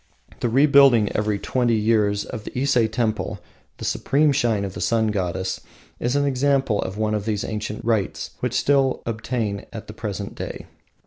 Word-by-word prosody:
The 120 - 0
rebuilding, 135 -4 +5
every 105 -1 0
twenty 120 +2 +1
years, 105 -2 +2
of 110 - -7
Ise 140 +1 +1 0.2
Temple, 110 -1 -1 0.4
the - - -6
supreme 145 +2 +2
shrine 115 -7 +1
of 95 - -6
the - - -6
Sun 110 -1 +2
Goddess, 95 -2 -2 0.4
is 120 +3 0
an 145 0 +2
example 135 -4 +1
of 95 +2 -5
one 110 0 0
of 105 -1 -2
these 105 -2 -1
ancient 105 +1 -4
rites 110 -5 -1
which 125 -1 -2
still 135 0 +2
obtain 110 -2 -3
at 110 -2 -7
the 105 - -9
present 100 -2 -5
day. - - -6
110 Hz, 170 wpm, -23 LUFS, 105-130 Hz, 0.4 s, rebuilding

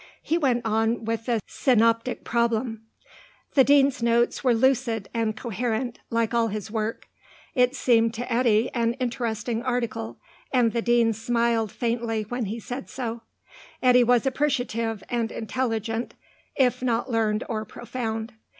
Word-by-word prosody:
He 325 - 0
went 255 -8 +1
on 225 +1 +1
with 225 +1 -3
the 235 -2 +2
Synoptic 230 -1 +2
Problem. 230 -1 -1 0.7
The 270 - +6
Dean's 280 -2 +4
notes 235 +2 +2
were 250 -3 +4
lucid 235 -4 +1
and 225 -2 -1
coherent, 235 +2 -2
like 230 0 0
all 230 -1 +3
his 215 0 -5
work. 220 0 -3 0.5
It 250 0 +3
seemed 230 -4 +3
to 245 +1 -3
Eddy 230 -2 +3
an 235 -1 +1
interesting 235 -3 -2
article, 235 -3 -2 0.3
and 245 -4 +3
the 235 - 0
Dean 235 -1 +3
smiled 230 -1 0
faintly 230 -2 -1
when 240 +2 -3
he 215 +4 -4
said 245 +4 -6
so. 235 -3 -4 0.6
Eddy 250 -1 +6
was 245 +1 +3
appreciative 245 -6 -1
and 235 -2 -1
intelligent, 225 0 -2 0.4
if 255 -3 +2
not 245 0 0
learned 220 -1 +1
or 215 -2 -2
profound. 230 -1 -5
235 Hz, 140 wpm, -25 LUFS, 225-245 Hz, 0.7 s, The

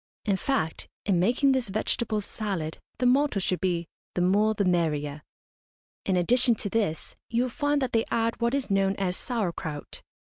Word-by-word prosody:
In 200 -2 +2
fact, 190 - -1 0.2
in 190 -4 +2
making 245 +9 +3
this 260 -5 0
vegetable 215 +1 0
salad 195 -7 -4 0.2
the 250 - 0
motto 265 -3 +3
should 185 -1 0
be 175 -3 0 0.3
"the 180 - +1
more 205 +4 +3
the 200 - +1
merrier." 150 -5 0 0.9
In 185 - +2
addition 240 +7 +4
to 205 - -4
this 200 -9 -1
you 235 +1 +2
will 255 - -3
find 290 +2 +1
that 255 - -1
they 225 0 +3
add 230 0 0
what 235 +3 +2
is 270 -6 -2
known 195 0 +2
as 185 -2 -1
sauer 220 -8 -2
kraut. 150 -3 -6
205 Hz, 180 wpm, -27 LUFS, 180-240 Hz, 0.9 s, addition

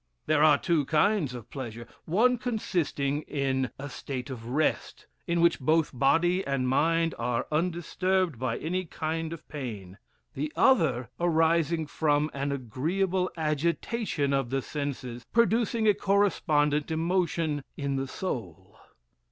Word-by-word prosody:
There 155 -1 +2
are 150 -2 +6
two 155 -1 +1
kinds 155 -2 +2
of 120 -3 -10
pleasure: 120 -4 -6 0.2
one 235 +8 +3
consisting 165 - -1
in 130 -2 0
a 140 - -6
state 130 -1 -6
of 115 -3 -7
rest, 145 +5 -1 0.2
in 170 0 +1
which 170 0 +4
both 155 +4 +2
body 170 +8 +2
and 135 -2 -1
mind 165 +5 +2
are 120 -1 -1
undisturbed 175 -1 0
by 125 -2 -1
any 180 +4 -2
kind 160 0 -3
of 165 - -9
pain; 105 -10 -7 0.3
the 150 +2 -3
other 130 - +3
arising 165 -1 +2
from 150 0 +1
an 140 +1 -2
agreeable 175 - -1
agitation 160 +1 -1
of 135 -3 0
the 135 0 -1
senses, 130 -5 -5
producing 230 0 +2
a 210 - +6
correspondent 155 -8 +2
emotion 165 -3 0
in 140 -1 -2
the 135 0 -2
soul. 95 - -6
150 Hz, 135 wpm, -28 LUFS, 135-170 Hz, 0.3 s, are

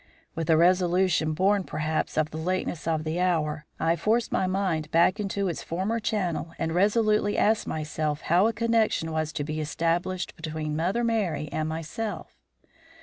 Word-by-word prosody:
With 165 -1 -4
a 160 - +6
resolution 180 -2 +3
born, 195 +4 +2
perhaps, 155 -2 -2
of 155 -1 +1
the 155 - -5
lateness 175 -2 -2
of 160 -1 0
the 160 +2 -2
hour, 155 -4 0
I 165 +1 +2
forced 220 +7 +1
my 185 - +1
mind 185 -5 -1
back 170 +5 +3
into 200 -1 -1
its 170 - -3
former 195 +7 -2
channel 180 -7 -2
and 165 0 -2
resolutely 210 +2 +2
asked 220 +1 +2
myself 155 -1 -2
how 180 +6 +3
a - - +2
connection 225 -7 +1
was 155 -1 -1
to 145 - -2
be 155 +1 -3
established 170 +5 -1
between 155 -2 -4
Mother 185 +9 0
Merry 185 -11 0
and 155 0 -2
myself. 165 +7 -5
170 Hz, 165 wpm, -26 LUFS, 155-195 Hz, -, a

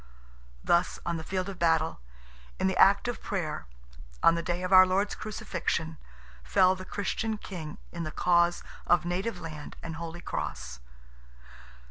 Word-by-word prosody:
Thus, 175 +1 +2
on 170 -1 -1
the 160 - -6
field 185 +2 -2
of 195 -2 -7
battle, 165 -1 +2 0.6
in - - +1
the 190 -1 +2
act 195 +5 +5
of 240 - -3
prayer, 175 - -3 0.6
on 165 - +7
the 170 - -1
day 175 +2 -2
of 185 +1 0
our 185 0 +11
Lord's 195 +3 +1
Crucifixion, 170 -6 -3 0.4
fell 185 - +4
the 185 0 -8
Christian 215 +3 -2
King 165 -7 -7
in 170 - -5
the 155 - -3
cause 175 +1 +2 0.2
of 175 0 +4
native 185 +3 -2
land 155 -3 -8
and 165 -1 -5
Holy 170 +1 -6
Cross. 65 - -5
175 Hz, 155 wpm, -29 LUFS, 165-190 Hz, 0.6 s, our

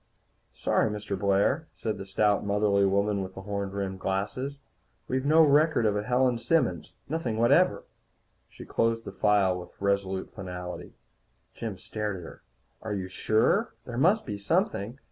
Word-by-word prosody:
"Sorry, - - +1
Mr. 105 -1 -4
Blair," 100 - +1
said 110 -3 -3
the 95 - -7
stout, 105 +1 +2
motherly 100 -1 +2
woman 100 +1 +1
with 95 - -7
the 95 - -8
horn 100 0 -3
rimmed 95 -1 -4
glasses. 105 +9 -2 0.5
"We've 130 +2 -1
no 160 +2 +6
record 150 -3 +4
of 105 -1 +2
a 105 - 0
Helen 125 +1 +1
Simmons. 115 - 0
Nothing 140 -8 -2
whatever." 120 +1 +4 0.7
She - - -11
closed 115 0 0
the - - -6
file 100 -3 +2
with 90 - -12
resolute 100 -1 -1
finality. 90 -2 -7 0.6
Jim 110 -5 -5
stared 105 +1 -4
at 90 - -9
her. - - -11 0.4
"Are 110 -2 -3
you 95 -1 -4
sure? 115 - +1
There 120 0 -4
must 190 +10 +3
be 105 -1 -5
something. 135 - 0
105 Hz, 160 wpm, -28 LUFS, 100-125 Hz, 0.7 s, no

